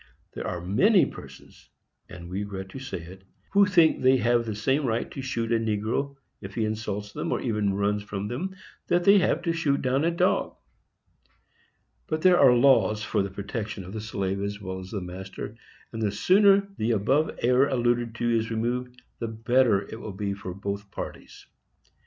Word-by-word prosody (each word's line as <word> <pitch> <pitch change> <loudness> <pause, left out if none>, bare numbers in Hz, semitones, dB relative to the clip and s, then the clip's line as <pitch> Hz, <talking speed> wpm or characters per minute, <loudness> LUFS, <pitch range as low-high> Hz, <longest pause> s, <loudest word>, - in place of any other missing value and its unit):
There - - -5
are 90 -1 -4
many 190 - +4
persons—and 85 -1 -13
we 90 +2 -4
regret 95 -2 -5
to 135 - -8
say 130 -10 -6
it—_who 95 - -1
think 170 -4 +4
they 130 +1 +5
have 120 0 +2
the 110 - -3
same 135 +7 +1
right 115 -3 -1
to 135 - -6
shoot 120 -3 -3
a 115 - +3
negro, 115 +6 -1 0.3
if 95 +1 -9
he 115 - 0
insults 105 -1 -4
them, - - -3
or - - 0
even 105 -5 0
runs 100 +1 0
from 100 -1 -5
them, 180 - -4 0.3
that 175 0 +2
they 200 +2 +7
have 180 - +1
to 170 -2 0
shoot 150 -4 +1
down 130 +3 +1
a 170 - +2
dog_; 170 - +1 1.5
but 155 0 -2
there 185 -1 +6
are 135 -3 +7
laws 115 -4 +4
for 115 - 0
the 100 - -2
protection 100 +1 -5
of 95 +2 -10
the 110 - -4
slave 100 -3 -3
as 100 0 -3
well 95 -2 -5
as 95 0 -9
the 100 -1 -4
master, 95 +4 -7 0.4
and 115 - -4
the 105 -2 +1
sooner 200 - +4
the 115 +2 +1
error - - +2
above 135 +10 +1
alluded 120 -2 +2
to 120 +1 -1
is 110 0 0
removed, 125 +2 -2 0.2
the 115 - -2
better 115 -2 +2
will 110 -1 -7
it 95 - -9
be 100 -1 -2
for 100 -2 -7
both 100 +1 -5
parties. - - -8
115 Hz, 190 wpm, -26 LUFS, 100-130 Hz, 1.5 s, they